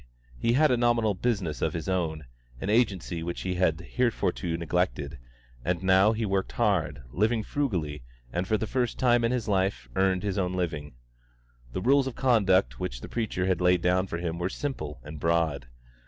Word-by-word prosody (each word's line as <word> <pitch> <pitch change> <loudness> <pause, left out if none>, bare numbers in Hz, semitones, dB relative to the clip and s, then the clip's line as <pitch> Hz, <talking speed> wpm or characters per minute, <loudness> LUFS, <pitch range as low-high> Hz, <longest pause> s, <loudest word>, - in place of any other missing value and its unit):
He 115 - +2
had 150 +3 +4
a 125 - +3
nominal 120 -3 +2
business 95 - -1
of - - 0
his 80 -2 -4
own, 80 -5 -1 0.3
an 100 - -2
agency 100 -7 +1
which 85 +1 -4
he 90 - -2
had 90 -3 +1
heretofore 125 -2 0 0.3
neglected, 85 -4 -1 0.4
and 90 +1 -1
now 95 +3 +5
he 110 0 -1
worked 95 -1 -1
hard, 95 - 0
living 110 - +1
frugally, 90 - -2 0.3
and 90 +2 -1
for 110 - +2
the 110 - -2
first 125 +2 -1
time 120 -2 +3
in 115 - +2
his 125 -3 -1
life 95 - 0
earned 95 -1 +2
his 100 -1 -1
own 90 -1 0
living. 80 -7 -3 0.8
The - - -2
rules 135 +5 +4
of 130 - -5
conduct 95 - +3
which - - -4
the - - -8
preacher 110 -6 -1
had 95 -2 +1
laid 90 -1 +3
down 90 +1 +2
for 85 - -4
him 85 -1 -3
were 90 +1 -1
simple 85 - -4
and 75 +2 -8
broad. 80 -5 +1
95 Hz, 185 wpm, -27 LUFS, 85-110 Hz, 0.8 s, now